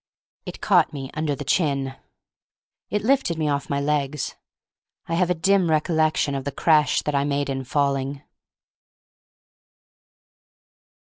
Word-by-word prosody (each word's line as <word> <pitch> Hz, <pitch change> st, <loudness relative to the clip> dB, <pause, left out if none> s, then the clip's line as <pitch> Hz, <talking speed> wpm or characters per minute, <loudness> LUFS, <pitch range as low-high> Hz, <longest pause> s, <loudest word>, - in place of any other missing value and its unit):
It -, -, -7 dB
caught 175 Hz, -5 st, +3 dB
me 135 Hz, -2 st, -6 dB
under 155 Hz, -2 st, -1 dB
the 145 Hz, -, -6 dB
chin. 140 Hz, -4 st, 0 dB, 0.9 s
It 210 Hz, 0 st, -1 dB
lifted 255 Hz, -9 st, +2 dB
me 155 Hz, -1 st, 0 dB
off 140 Hz, -1 st, -1 dB
my 140 Hz, -, 0 dB
legs. 145 Hz, 0 st, -1 dB, 0.7 s
I 165 Hz, -, -4 dB
have 175 Hz, +1 st, +2 dB
a 180 Hz, -, +2 dB
dim 185 Hz, +1 st, +2 dB
recollection 155 Hz, -2 st, +1 dB
of 135 Hz, -1 st, -3 dB
the 140 Hz, -, -3 dB
crash 150 Hz, +1 st, +3 dB
that 150 Hz, -, -2 dB
I 140 Hz, 0 st, +2 dB
made 140 Hz, -1 st, -1 dB
in 135 Hz, 0 st, -3 dB
falling. 140 Hz, +1 st, -1 dB
150 Hz, 135 wpm, -23 LUFS, 140-165 Hz, 0.9 s, caught